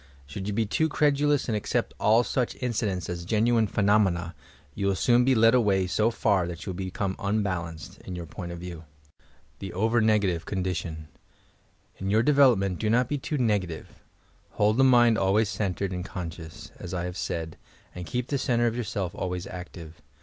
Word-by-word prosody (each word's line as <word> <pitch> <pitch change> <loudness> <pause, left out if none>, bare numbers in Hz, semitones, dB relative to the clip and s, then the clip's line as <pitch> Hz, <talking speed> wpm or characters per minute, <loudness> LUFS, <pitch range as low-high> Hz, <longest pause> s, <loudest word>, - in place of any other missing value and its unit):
Should 95 +8 -6
you 105 - -2
be 115 0 +1
too 160 +10 0
credulous 145 -1 +2
and 115 - 0
accept 105 - -1
all 110 +3 +4
such 125 +2 -1
inci 120 -4 -2
dents 90 -3 -3
as 85 -1 -5
genuine 110 +3 +2
phenomena, 100 -5 +1 0.4
you 100 +6 -2
will 100 - +2
soon 120 +4 +3
be 130 +1 +3
led 115 +1 +5
away 100 -6 +3
so 105 +5 +1
far 100 -6 +1
that 85 -1 -7
you 95 - -3
will - - -6
become 95 0 -3
unbalanced, 90 -6 -3
in 90 - -7
your 85 -1 -6
point 85 +3 -7
of 85 - -6
view. 85 -2 -8 0.7
THE 95 - -6
OVEE 110 +4 +2
NEGATIVE 100 -6 +2
CONDITION 85 -5 -3 0.9
In 95 - -3
your 110 +3 +3
development 120 -10 +4
do 110 - 0
not 120 +2 +2
be 145 - -1
too 150 +3 -3
negative; 100 - -2 0.5
hold 105 +2 +2
the 135 - +5
mind 120 -3 +5
always 100 +2 +2
centred 100 -2 -2
aod 90 0 -4
conscious, 85 -4 -8
as 90 0 -6
I 85 - -2
have 90 0 -5
said, 80 -3 -4 0.4
and 90 -1 -8
beep 125 0 -1
the 140 - 0
centre 120 -2 +1
of 115 -1 0
yourself 105 -6 -3
always 90 -1 -4
active. 85 -3 -9
100 Hz, 185 wpm, -26 LUFS, 90-115 Hz, 0.9 s, led